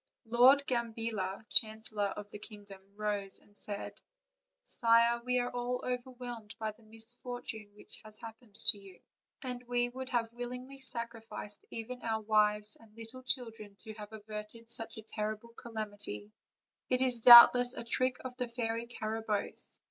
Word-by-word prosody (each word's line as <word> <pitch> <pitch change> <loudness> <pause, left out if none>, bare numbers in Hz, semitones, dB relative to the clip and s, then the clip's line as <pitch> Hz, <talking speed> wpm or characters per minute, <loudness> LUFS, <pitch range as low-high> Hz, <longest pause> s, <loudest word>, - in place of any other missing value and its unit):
Lord 255 +5 +5
Gambilla, 225 -5 -3
chancel 220 -1 +3
lor 205 -1 +2
of 205 +1 -8
the 210 - -9
kingdom, 205 -3 -12
rose 205 -2 -3
and 205 - -24
said: 205 -1 -6 0.6
"Sire, 235 0 +4
we 250 0 0
are 245 0 -1
all 245 0 -3
over 250 0 -3
whelmed 240 -4 -8
by 220 -1 -3
the 215 - -23
misfortune 225 -1 -3
that - - -11
has 215 -1 -14
happened 225 -2 -12
to 205 - +6
you, 195 -2 -15 0.4
and 250 -1 -5
we 245 0 0
would 260 +1 -7
have 235 -2 -1
willingly 250 +3 -7
sacrificed 230 -5 -3
even 245 +2 -7
our 220 -1 -2
wives 210 -1 +1
and 225 -1 -21
little 230 +3 -9
children 225 -5 -3
to 220 - -8
have 210 0 -10
averted 215 +2 -9
such 225 -1 +1
a 220 - -8
terrible 215 +1 -5
calam 220 -3 -6
ity; 105 - -4 0.6
it 255 0 +2
is 250 -2 +2
doubtless 245 +1 +9
a - - -4
trick 255 +2 +1
of 255 -1 -6
the 250 -1 -2
Fairy 230 -1 -3
Carabosse. 220 -2 -1
225 Hz, 160 wpm, -32 LUFS, 210-245 Hz, 0.6 s, doubtless